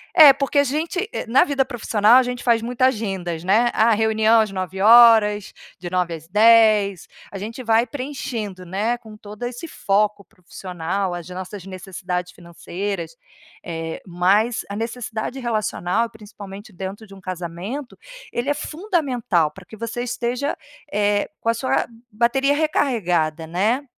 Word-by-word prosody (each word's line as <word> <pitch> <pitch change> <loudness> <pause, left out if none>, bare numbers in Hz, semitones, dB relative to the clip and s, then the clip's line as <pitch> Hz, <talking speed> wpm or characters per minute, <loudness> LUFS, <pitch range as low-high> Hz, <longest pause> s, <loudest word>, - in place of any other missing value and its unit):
É, 310 -5 +10
porque 275 +2 -2
a - - +5
gente 330 - -2
eh, - - -3
na 255 +4 +5
vida 275 -2 0
profissional, 225 -3 +3
a 260 - +5
gente 245 0 -4
faz 235 -2 +3
muita 245 +2 0
agendas, 195 -9 -2
né? 220 +6 +3
A 225 +2 +4
reunião 220 +1 +3
às 215 -2 +2
9h 210 +2 +5 0.2
de 175 0 -7
9 180 -1 -1
às 160 -1 -8
10. 210 -2 +4 0.3
A 195 - -5
gente 225 +6 -6
vai 225 0 +3
preenchendo, 240 -9 -5
né, 205 +7 -1
com 220 -3 -13
todo 210 +2 -10
esse 245 +6 -5
foco 205 -5 0
profissional, 180 +1 -5
as 175 -1 -7
nossas 185 +1 -7
necessidades 180 -1 -5
financeiras, 170 0 -6 0.4
eh, 165 -1 -5
mas 195 +7 +2
a 200 - -5
necessidade 230 +1 -4
relacional 220 -3 -1
e, - - -9
principalmente 205 -2 -11
dentro 195 +3 -7
de 200 - -15
um 195 - -12
casamento, 185 - -6 0.3
ele 240 +4 -2
é - - +3
fundamental 285 - -1
pra 195 - -14
que 220 - -12
você 230 +2 -4
esteja, 245 +3 -2 0.4
eh, 205 0 +1
com 230 - 0
a - - +4
sua 255 +3 0 0.3
bateria 240 +6 +2
recarregada, 180 - 0
né, 210 - 0
215 Hz, 155 wpm, -21 LUFS, 185-240 Hz, 0.4 s, É